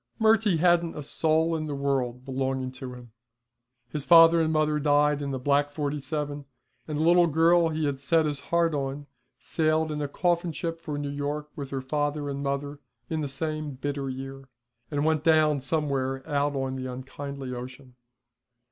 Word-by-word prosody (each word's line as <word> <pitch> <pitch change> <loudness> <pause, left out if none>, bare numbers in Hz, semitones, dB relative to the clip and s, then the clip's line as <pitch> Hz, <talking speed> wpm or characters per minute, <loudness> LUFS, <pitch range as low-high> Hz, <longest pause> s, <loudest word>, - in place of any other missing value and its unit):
Murty 220 -4 +4
hadn't 170 -1 +2
a 150 - -5
soul 160 +3 +1
in 155 -1 -3
the 145 - -3
world 130 -3 -1
belonging 130 -1 -2
to 130 -1 -8
him. 120 -2 -13 0.8
His 150 -2 -3
father 165 +1 +7
and 160 0 +1
mother 155 -1 +1
died 145 0 +3
in 140 - -3
the 135 - -2
black 145 +2 +2
'47, 145 0 -3 0.4
and 155 -1 -3
the - - +2
little 175 +1 +5
girl 165 +2 +4
he 155 -1 -1
had 140 -2 -1
set 160 +3 +2
his 145 -2 -1
heart 170 -1 +2
on 140 0 -3 0.3
sailed 155 0 0
in 150 0 -3
a 145 - -1
coffin 170 +2 0
ship 165 +1 -4
for 150 -3 -4
New 145 -1 -3
York 145 +1 -3
with 140 -2 -6
her 135 -1 -3
father 145 +2 -2
and 140 0 -4
mother 140 +1 -3 0.3
in 160 -1 -1
the 145 - -2
same 155 +1 -3
bitter 140 0 -3
year, 135 +1 -7 0.4
and 145 +1 -1
went 155 -1 +1
down 155 -3 +4
somewhere 135 -2 -1
out 145 0 0
on 135 -1 -2
the 130 0 -4
unkindly 135 +1 -6
ocean. 125 +1 -9
145 Hz, 180 wpm, -27 LUFS, 135-155 Hz, 0.8 s, father